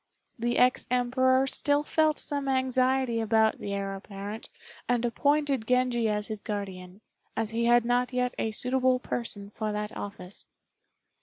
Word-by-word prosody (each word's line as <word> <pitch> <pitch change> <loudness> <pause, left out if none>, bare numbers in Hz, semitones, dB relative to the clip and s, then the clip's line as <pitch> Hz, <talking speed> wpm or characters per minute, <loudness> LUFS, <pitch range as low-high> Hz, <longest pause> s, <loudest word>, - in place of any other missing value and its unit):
The 240 +1 0
ex 250 0 +3
Emperor 260 +1 +3
still 290 +2 +2
felt 310 0 +2
some 285 -1 -2
anxiety 260 -2 +2
about 220 0 +2
the 200 0 -3
Heir 195 0 -3
apparent, 200 +2 -7 0.4
and 245 -1 +2
appointed 280 -1 +1
Genji 250 -3 +2
as 210 0 -1
his 215 -2 -6
guardian, 195 -2 -6 0.4
as 225 -1 0
he 230 +1 0
had 240 0 +5
not 245 +1 +1
yet 250 0 0
a 225 - 0
suitable 255 +3 +1
person 210 -5 -5
for 215 0 -3
that 210 0 -4
office. 200 -2 -6
240 Hz, 150 wpm, -28 LUFS, 210-255 Hz, 0.4 s, had